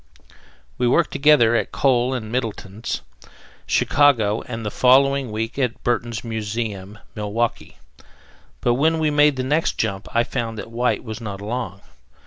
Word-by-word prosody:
We 125 - +2
worked 120 - +2
together 140 -5 +4
at - - 0
Kohl 130 -1 +2
and 110 -3 -5
Middleton's, 115 -3 -4 0.7
Chicago, 115 -8 +3
and 115 -2 -5
the 105 - -2
following 135 0 +3
week 115 +5 -3
at 125 -3 -1
Burton's 120 -2 -1
Museum, 110 -3 -4 0.2
Milwaukee; 105 +2 -3 0.8
but 120 - +2
when 160 +6 +2
we 155 -1 +1
made 145 -1 +4
the 130 - -2
next 150 +5 0
jump 95 0 -2
I 115 - +2
found 115 -3 -4
that 115 - -7
White 120 +2 0
was 110 0 -7
not 100 -3 -6
along. 105 -2 -4
120 Hz, 145 wpm, -22 LUFS, 110-130 Hz, 0.8 s, together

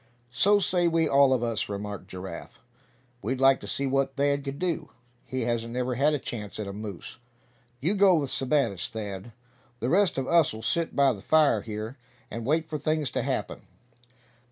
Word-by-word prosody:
"So 205 +11 +4
say 180 -3 +2
we 165 -1 +2
all 140 -1 +5
of 125 -2 +2
us," 115 -3 -1
remarked 100 0 -5
Giraffe. 95 +1 -8 0.6
"We'd 125 +6 -2
like 135 0 +5
to - - -9
see 140 - -2
what 135 0 0
Thad 140 0 +1
could 140 0 -5
do. 175 0 -2 0.4
He 130 0 -3
hasn't 115 0 -2
never 125 0 -1
had 145 +5 +2
a - - +1
chance 110 -6 -6
at 105 - -3
a 100 - -6
moose. 105 -1 -8 0.6
You 165 +10 +1
go 195 -2 +5
with 140 -5 -1
Sebattis, 130 - 0
Thad. 105 0 -6 0.5
The 120 - -1
rest 190 -2 +3
of 130 -1 -1
us'll 155 -10 +2
sit 165 +9 0
by 140 -2 +4
the 100 - -10
fire 150 -7 +4
here, 110 +4 -6 0.3
and 115 0 -5
wait 160 +2 +1
for 155 -1 -4
things 155 -1 0
to - - -1
happen." - - -3
135 Hz, 185 wpm, -27 LUFS, 110-155 Hz, 0.6 s, all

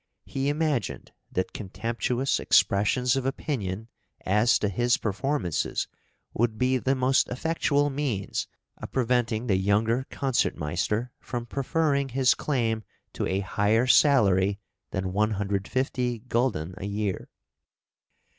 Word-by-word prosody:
He 135 +1 -1
imagined 145 - -1 0.2
that 95 - -2
contemptuous 115 +6 -1
expressions 120 +6 +3
of 135 - -1
opinion 115 - -3 0.4
as 105 +5 +4
to 105 - 0
his 120 +5 +2
performances 105 - -1 0.5
would 115 -1 0
be 130 +1 +2
the 135 +2 +1
most 130 +1 +3
effectual 145 +1 +1
means 135 -9 -2 0.3
of - - -7
preventing 120 -2 +1
the 100 -6 +2
younger 110 +6 +1
Concertmeister 115 - -1
from 120 -1 -5
preferring 140 +1 0
his 130 0 +3
claim 115 -6 -1 0.3
to - - -2
a 95 +1 0
higher 105 +4 +2
salary 100 -8 +4 0.3
than 95 -1 -3
150 105 +4 -1
gulden 115 -10 0
a 95 - -5
year. 100 -1 -3
120 Hz, 115 wpm, -27 LUFS, 100-130 Hz, 0.5 s, as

